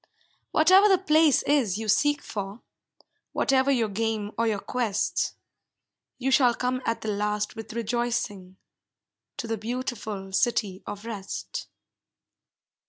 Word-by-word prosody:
Whatever 375 +6 +6
the 380 - +6
place 315 -5 +4
is 260 -10 +2
you 220 0 -5
seek 290 +6 +2
for, 200 +1 -6 0.7
Whatever 265 0 +2
your 240 -5 +2
game 215 0 -2
or 230 0 +1
your 215 -2 +1
quest, 220 -1 -1 0.8
You 265 +1 -1
shall 250 -3 +5
come 255 0 -1
at 230 - -1
the 220 - -3
last 210 0 -1
with 225 -1 -8
rejoicing, 230 -5 -2 0.8
To - - -4
the 225 -2 -3
beautiful 220 -4 -4
City 195 -2 0
of 205 +1 -6
Rest. 205 -4 -5
230 Hz, 125 wpm, -26 LUFS, 205-255 Hz, 0.8 s, Whatever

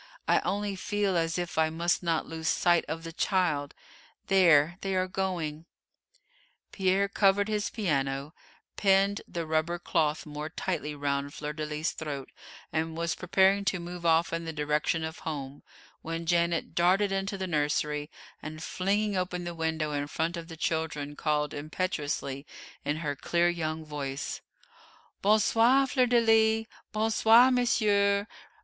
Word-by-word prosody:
"I - - +4
only 205 0 -2
feel 200 0 -1
as 165 0 0
if 175 -2 -2
I 160 0 +3
must 170 +2 0
not 165 -3 0
lose 160 0 -5
sight 175 -1 +3
of 165 +1 -4
the 165 0 -7
child 160 -7 0 0.5
there 175 -3 +5
they 195 -1 -2
are 185 0 +1
going!" 175 -5 -3 1.1
Pierre 195 0 +2
covered 200 0 +3
his 210 -1 -1
piano, 140 -6 -1 0.4
pinned 195 0 +3
the 170 -1 -4
rubber 160 +2 0
cloth 155 -3 0
more 150 0 -6
tightly 160 -4 -3
round 140 0 -2
Fleur 150 0 -4
de 155 0 -4
lis's 150 +2 -2
throat, 145 -4 -6 0.4
and 160 0 -1
was 170 0 0
preparing 190 +2 +3
to 190 -1 0
move 175 0 -7
off 165 0 +3
in 165 0 -2
the 165 - -3
direction 150 +1 0
of 160 0 -5
home, 140 -3 -6 0.4
when 165 +1 -4
Janet 170 -1 +1
darted 190 +4 +3
into 195 +1 -2
the 190 - -3
nursery, 150 -2 -1 0.3
and, 155 +1 -7
flinging 200 +4 0
open 180 -1 -2
the 175 0 -4
window 160 -2 -2
in 145 0 -2
front 165 +3 -2
of 170 -1 -7
the 165 -1 -9
children, 155 -3 -2
called 150 -1 0
impetuously 145 -3 -3 0.4
in 145 +1 -1
her 145 -1 -1
clear 170 +4 +1
young 160 -2 -3
voice; 145 -2 -4 0.8
"Bon 210 +2 +4
soir, 240 +6 +4
Fleur 255 -1 +2
de 240 0 +4
lis! 225 0 +4 0.3
Bon 220 +1 0
soir, 230 +4 +6
monsieur! 205 -5 +2
170 Hz, 155 wpm, -29 LUFS, 150-195 Hz, 1.1 s, soir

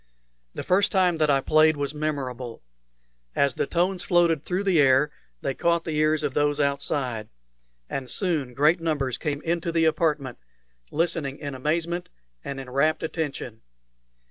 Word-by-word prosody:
The - - -4
first 195 +2 +3
time 180 -3 +3
that 155 -1 +2
I 135 -1 +4
played 155 +2 +4
was 145 0 -2
memorable. 130 - -4 0.7
As 140 -1 +2
the - - -1
tones 180 +2 0
floated 170 -4 +3
through 185 +2 -1
the 185 -6 +4
air 135 +2 +4 0.3
they 135 - -1
caught 170 +3 +1
the 160 - -3
ears 155 0 +2
of 145 -3 -1
those 145 +1 +1
outside, 140 -5 -1 0.6
and 130 -2 -5
soon 150 - -1
great 155 +5 +3
numbers 145 -6 -1
came 145 -1 -3
into 170 0 -1
the 165 -1 +2
apartment, 150 -5 0 0.5
listening 150 -3 -1
in 145 -3 -6
amazement 165 +6 -2 0.3
and 135 -1 -5
in 135 - -8
rapt 140 +6 +1
attention. 145 -8 -4
150 Hz, 155 wpm, -25 LUFS, 140-165 Hz, 0.7 s, I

